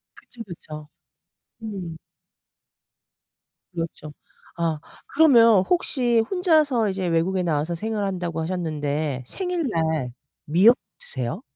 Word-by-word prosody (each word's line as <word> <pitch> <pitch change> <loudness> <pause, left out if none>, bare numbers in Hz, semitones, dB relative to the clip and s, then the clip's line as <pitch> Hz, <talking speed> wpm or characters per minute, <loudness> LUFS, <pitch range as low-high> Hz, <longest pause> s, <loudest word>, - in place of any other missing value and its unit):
그쵸, 235 - -12
그쵸. 155 -6 -10 0.8
음. 190 -7 -6 1.8
그렇죠. 165 -3 -6 0.4
아 165 -2 -1 0.3
그러면 230 -10 +6
혹시 250 -9 +2
혼자서 310 - +2
이제 190 -1 -2
외국에 175 +3 +1
나와서 160 0 -1
생활을 215 +3 -2
한다고 175 -4 -3
하셨는데 155 -5 -2
생일날 165 - -2 0.3
미역 190 +11 +6 0.2
드세요? 125 -3 -5
180 Hz, 225 characters per minute, -23 LUFS, 160-230 Hz, 1.8 s, 그러면